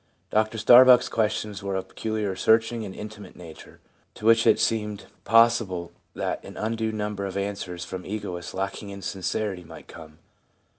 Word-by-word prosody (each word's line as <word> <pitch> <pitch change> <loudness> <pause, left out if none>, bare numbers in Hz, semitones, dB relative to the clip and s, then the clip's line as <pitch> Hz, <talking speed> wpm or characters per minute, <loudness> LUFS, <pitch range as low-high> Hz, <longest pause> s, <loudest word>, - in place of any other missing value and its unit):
Dr 110 +1 +1
Starbuck's 125 +3 +7
questions 105 -2 -1
were 100 -1 -3
of 95 - -2
a - - -27
peculiarly 110 -3 -3
searching 110 +3 +2
and 95 -2 -7
intimate 105 -2 -9
nature, 85 -3 -13 0.4
to 105 - -9
which 115 0 +5
it - - +5
seemed 105 -2 -1 0.2
possible 115 -6 +3 0.2
that - - -3
an - - -11
undue 110 0 -2
number 105 -2 -3
of 95 - -5
answers 100 -3 -4
from 90 0 -7
egotists 90 -4 -6
lacking 100 +2 -4
in 100 -1 -9
sincerity 95 0 -3
might 80 -1 -13
come. 80 -2 -13
105 Hz, 160 wpm, -25 LUFS, 95-110 Hz, 0.4 s, Starbuck's